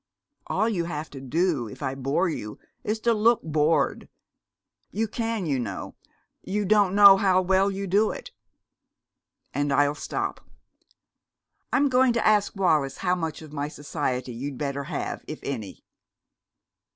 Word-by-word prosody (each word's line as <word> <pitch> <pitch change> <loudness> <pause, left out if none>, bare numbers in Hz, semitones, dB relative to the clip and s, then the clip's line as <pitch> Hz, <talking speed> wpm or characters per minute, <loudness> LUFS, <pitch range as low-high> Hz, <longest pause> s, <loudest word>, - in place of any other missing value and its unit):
All 220 - +1
you 185 -7 -1
have 155 -2 -5
to 135 - -9
do 150 -2 0
if 105 - -10
I 130 - -1
bore 135 +7 0
you 105 -10 -5 0.3
is 215 +1 -2
to 235 0 +3
look 225 +2 +3
bored. 155 0 +1 0.8
You 225 +1 -1
can, 225 -3 -2
you 140 -4 0
know. 100 -6 -5 0.5
You 205 +2 -2
don't 200 -1 +3
know 200 -1 +9
how 190 -2 +3
well 190 +2 +3
you 195 0 -4
do 205 +4 +3
it! - - -7 1.2
And 145 +1 0
I'll 145 +1 +3
stop. - - -4 1.3
I'm 285 - +3
going 255 -1 +3
to 235 - 0
ask 210 -1 +3
Wallis 155 -8 +1
how 180 - +3
much 165 -3 -3
of 155 -1 -12
my 145 -1 -2
society 140 -4 -3
you'd 135 +3 -5
better 140 0 -3
have, 155 -2 -4
if 155 - -5
any." 115 -8 -6
165 Hz, 150 wpm, -25 LUFS, 140-205 Hz, 1.3 s, know